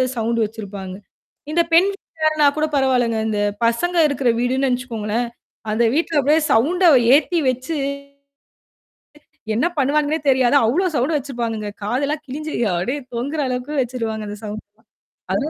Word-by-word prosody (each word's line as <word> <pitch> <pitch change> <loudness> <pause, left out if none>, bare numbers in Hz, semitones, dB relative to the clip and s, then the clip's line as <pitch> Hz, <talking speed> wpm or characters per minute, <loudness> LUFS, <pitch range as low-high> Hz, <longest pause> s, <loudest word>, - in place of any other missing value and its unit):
Sound 230 0 0
வச்சிருப்பாங்க. 200 -3 -7 0.6
இந்த 340 +2 +3
பெண் 355 +4 +6
வீட்டார்ன்னா 310 -5 0
கூடப் 310 0 -1
பரவால்லங்க. 250 -4 +2
அந்தப் 205 -1 -1
பசங்க 345 +11 0
இருக்குற 275 -3 0
வீடுன்னு 255 +3 +1
நெனச்சுக்கோங்களேன்! 240 -2 -2 0.4
அந்த 220 +2 +1
வீட்டுல 320 0 +1
அப்டியே 295 +4 +3
சவுண்ட 330 +12 +2 0.3
ஏத்தி 325 +4 +3
வச்சு 255 +6 -3 1.8
என்னா 245 +10 +2
பண்ணுவானுங்கன்னே 295 +3 +1
தெரியாது. 260 0 +3
அவ்வளோ 330 +12 +1
சவுண்டு 285 +5 +1
வச்சிருப்பானுங்க. 235 -6 -4
காது 245 +7 -1
எல்லாம் 300 +1 -3
கிழிஞ்சு 305 +4 -6 0.2
அப்படியே 250 +12 -2 0.2
தொங்குற 280 +7 -3
அளவுக்கு 255 +3 -3
வெச்சிடுவாங்க. 225 -4 -3
அந்த 205 - -7
சவுண்டு. 215 0 -6 0.7
அதுல 295 +2 -1
255 Hz, 130 wpm, -20 LUFS, 230-300 Hz, 1.8 s, பெண்